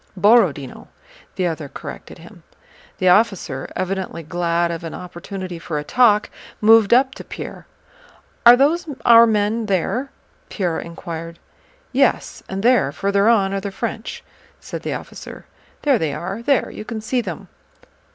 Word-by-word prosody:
"Borodinó," 185 Hz, -, +2 dB, 0.5 s
the 185 Hz, -, -1 dB
other 160 Hz, -4 st, -3 dB
corrected -, -, -9 dB
him. -, -, -15 dB, 0.6 s
The 185 Hz, -, +2 dB
officer, 180 Hz, -, +1 dB
evidently 185 Hz, -2 st, -3 dB
glad 170 Hz, +1 st, 0 dB
of 170 Hz, 0 st, -5 dB
an 165 Hz, -, -6 dB
opportunity 180 Hz, 0 st, -7 dB
for 165 Hz, -2 st, -4 dB
a 150 Hz, -, -3 dB
talk, 215 Hz, +3 st, +3 dB, 0.3 s
moved 220 Hz, -1 st, +5 dB
up 260 Hz, +2 st, +4 dB
to -, -, -10 dB
Pierre. -, -, -9 dB, 0.8 s
"Are 240 Hz, +1 st, +10 dB
those 325 Hz, +6 st, +2 dB, 0.2 s
our 230 Hz, 0 st, +8 dB
men 215 Hz, +1 st, 0 dB
there?" 215 Hz, +8 st, -1 dB, 0.4 s
Pierre 175 Hz, -5 st, -2 dB
inquired. 165 Hz, 0 st, -7 dB, 0.5 s
"Yes, 265 Hz, -1 st, +1 dB
and 195 Hz, +1 st, -4 dB
there, 245 Hz, -, +3 dB
further 200 Hz, +6 st, +1 dB
on, 195 Hz, -4 st, +3 dB
are 195 Hz, -, -2 dB
the 200 Hz, -, -4 dB
French," 220 Hz, +3 st, -5 dB, 0.4 s
said -, -, -7 dB
the -, -, -3 dB
officer. -, -, -9 dB, 0.4 s
"There 275 Hz, -6 st, +3 dB
they 150 Hz, -3 st, -1 dB
are, 190 Hz, +6 st, -5 dB
there... 275 Hz, 0 st, +1 dB
you -, -, -8 dB
can 220 Hz, 0 st, -5 dB
see 245 Hz, +3 st, -1 dB
them." 180 Hz, -8 st, -7 dB
195 Hz, 150 wpm, -20 LUFS, 170-230 Hz, 0.8 s, Are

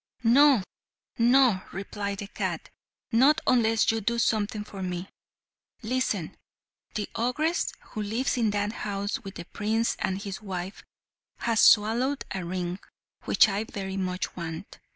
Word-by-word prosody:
"No, 260 Hz, -1 st, +6 dB, 0.6 s
no," 240 Hz, -4 st, +5 dB
replied 200 Hz, +1 st, -4 dB
the 200 Hz, -, -6 dB
cat. -, -, -4 dB, 0.4 s
"Not 270 Hz, +7 st, +5 dB
unless 225 Hz, -3 st, +3 dB
you 225 Hz, 0 st, -2 dB
do 235 Hz, +3 st, 0 dB
something 215 Hz, -2 st, 0 dB
for 200 Hz, -2 st, -9 dB
me. 180 Hz, 0 st, -3 dB, 0.8 s
Listen. 220 Hz, -7 st, -1 dB, 0.6 s
The 210 Hz, -, -2 dB
ogress, 300 Hz, +9 st, 0 dB, 0.2 s
who 215 Hz, -, -4 dB
lives 225 Hz, +6 st, -1 dB
in 230 Hz, -3 st, +2 dB
that 205 Hz, 0 st, 0 dB
house 200 Hz, -1 st, -3 dB
with 195 Hz, -1 st, -8 dB
the 170 Hz, -, -7 dB
prince 220 Hz, +5 st, 0 dB
and 190 Hz, 0 st, -1 dB
his 200 Hz, -1 st, -6 dB
wife, 190 Hz, -2 st, -6 dB, 0.5 s
has 230 Hz, -2 st, 0 dB
swallowed 235 Hz, +6 st, +4 dB
a 190 Hz, -1 st, -3 dB
ring, 180 Hz, +1 st, -3 dB, 0.5 s
which -, -, +5 dB
I 205 Hz, +1 st, -1 dB
very 195 Hz, -3 st, -5 dB
much 185 Hz, -1 st, -3 dB
want. 165 Hz, +1 st, -7 dB
210 Hz, 140 wpm, -27 LUFS, 195-235 Hz, 0.8 s, No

